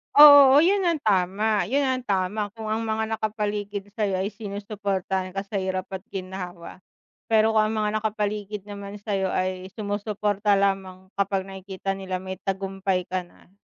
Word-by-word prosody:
Oo, 285 -1 +10
yun 385 +2 +3
ang 330 -4 +1
tama, 200 +1 +2
yun 275 +8 +1
ang 260 -2 -1
tama 200 +2 -1
kung 220 -1 -6
ang 225 +1 -1
mga 220 0 -1
nakapaligid 205 -1 -3
sa'yo 195 -3 0
ay 200 - -1
sinusuportahan 200 -3 -3
ka 195 - -2
sa 200 0 -5
hirap 185 -1 -2
at 190 +1 -7
ginhawa, 185 -2 -6 0.5
pero 220 0 +4
kung 215 -1 +3
ang 215 - -1
mga 210 - +1
nakapaligid 210 -1 -2
naman 200 0 -8
sa'yo 195 -3 -1
ay 185 +1 -2
sumusuporta 205 -1 -1
lamang 190 -1 0
kapag 195 -1 0
nakikita 195 0 -5
nila 185 -1 -4
may 190 -1 -6
tagumpay 195 -1 -2
ka 185 -1 -2
na 175 - -23
200 Hz, 160 wpm, -25 LUFS, 190-215 Hz, 0.5 s, Oo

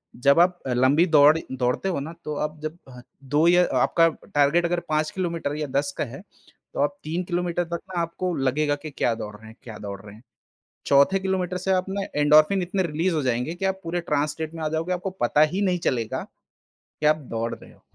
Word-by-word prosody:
जब 140 +5 +4
आप 175 +1 +3
लंबी 130 +7 +3
दौड़ 150 +2 +7
दौड़ते 125 +8 -1
हो 175 - -1
ना 155 +4 -6
तो 150 -1 -3
आप 155 0 -16
जब 155 +2 -4 0.5
2 150 +5 +2
या 175 +1 +6 0.2
आपका 165 0 +4 0.3
टारगेट 145 +4 +3
अगर 175 0 0
5 155 0 0
किलोमीटर 170 -5 -3
या 150 -1 -3
10 140 -1 -3
का - - 0
है, 135 +4 -8 0.5
तो - - -5
आप 285 - 0
3 170 +4 -2
किलोमीटर 175 0 -1
तक 170 0 -5
मे - - 0
आपको 170 +2 -3
लगेगा 145 +2 +1
कि - - -4
क्या 120 -3 0
दौड़ 105 -1 -7
रहे 110 +1 -14
हैं, 110 - -13
क्या 115 -5 -9
दौड़ 100 -1 -6
रहे 105 0 -12
हैं। 110 - -18 0.6
चौथे 140 +8 +4
किलोमीटर 185 -1 -2
से 190 - -3
आप 185 0 +2
ना 200 +1 -2 0.2
एंडोर्फिन 155 +6 +5
इतने 185 +2 -1
रिलीज़ 170 +2 -1
हो 155 - 0
जाएँगे 125 +5 -1
कि 185 - -6
आप 190 0 0
पूरे 175 +1 -2
ट्रांस 150 -3 0
स्टेट 160 +1 -6
में 160 - -6
आ 155 - +1
जाओगे। 160 +3 -2
आपको 180 +2 -3
पता 120 +5 +2
ही 195 +3 -1
नहीं 185 -2 +1
चलेगा 115 -4 -2 0.8
कि 150 - +1
आप 155 - +5
दौड़ 115 0 -2
रहे - - -16
हो - - -25
155 Hz, 220 wpm, -24 LUFS, 140-175 Hz, 0.8 s, दौड़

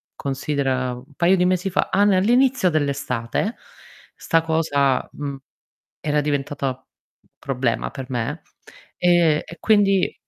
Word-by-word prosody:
considera 135 -2 -2
un 130 +4 -12
paio 180 +2 +4
di 180 0 +2
mesi 185 +1 +1
fa 190 - 0
ah 200 - +3
n 205 - +4
all'inizio 245 +2 +3
dell'estate, 140 - -1 0.6
'sta 165 0 +1
cosa, 150 -5 +1
mhmm, 140 -1 -5 0.6
era 150 -1 0
diventata 140 -2 -2 0.5
problema 125 -3 -2
per 135 -2 -7
me, 130 +6 -3 0.6
e 175 -4 +3
e 170 - -11
quindi 200 -3 +3
150 Hz, 125 wpm, -22 LUFS, 135-180 Hz, 0.6 s, paio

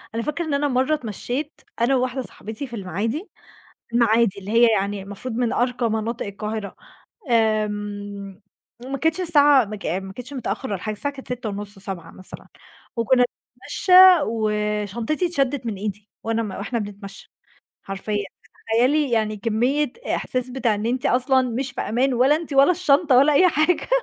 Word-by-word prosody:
أنا 230 - -1
فاكرة 300 +3 -2
إن 310 - -2
أنا 285 +1 +1
مرّة 260 +2 +1
اتمشيّت 260 - -4 0.2
أنا 255 +3 +3
وواحدة 255 +1 -1
صاحبتي 225 +2 -7
في 235 - -8
المعادي، 220 - -3 0.6
المعادي 230 -3 +3
اللي 200 +1 -7
هي 235 +1 +6
يعني 200 -1 0
المفروض 205 +5 -6
من 240 -1 0
أرقى 245 -1 0
مناطق 225 +1 -2
القاهرة. 210 0 -5 0.5
آمم. 205 -3 -1 0.4
وما 275 +1 -3
كانتش 320 +5 0
الساعة 290 -6 +5
ماك 210 0 -8
ما 190 +2 -3
كانتش 250 +6 -9
متأخر 255 0 -4
والّا 190 - -3
حاجة 215 -1 -3
الساعة 285 +7 -3
كانت 270 -1 -11
18:30 205 -4 -6
19:00 190 -3 -7
مثلًا، 185 - -12 0.5
وكُنا 245 +2 +3 0.3
بنتمشى 370 - -1 0.3
وشنطتي 215 - -1
اتشدت 280 -6 -1
من 225 -3 -2
إيدي 205 +1 -6
وأنا 225 0 0
م 210 - -5
وإحنا 205 +5 -3
بنتمشى، 200 -1 -9 0.5
حرفيًا. 200 +1 -3 0.5
تخيّلي 270 +4 +3
يعني 215 -2 0
كمية 245 +7 0 0.2
إحساس 255 0 -3
بتاع 245 -4 0
إن 210 +2 -3
أنتِ 250 +1 0
أصلًا 260 +1 +3
مش 250 +1 -3
في - - -5
أمان 255 +4 +1
ولا 265 +5 +4
أنتِ 320 -2 -6
ولا 275 +4 +6
الشنطة 315 -5 +3
ولا 280 +3 +5
أي 365 +6 +6
حاجة. 315 +3 +1
235 Hz, 160 wpm, -22 LUFS, 210-270 Hz, 0.6 s, هي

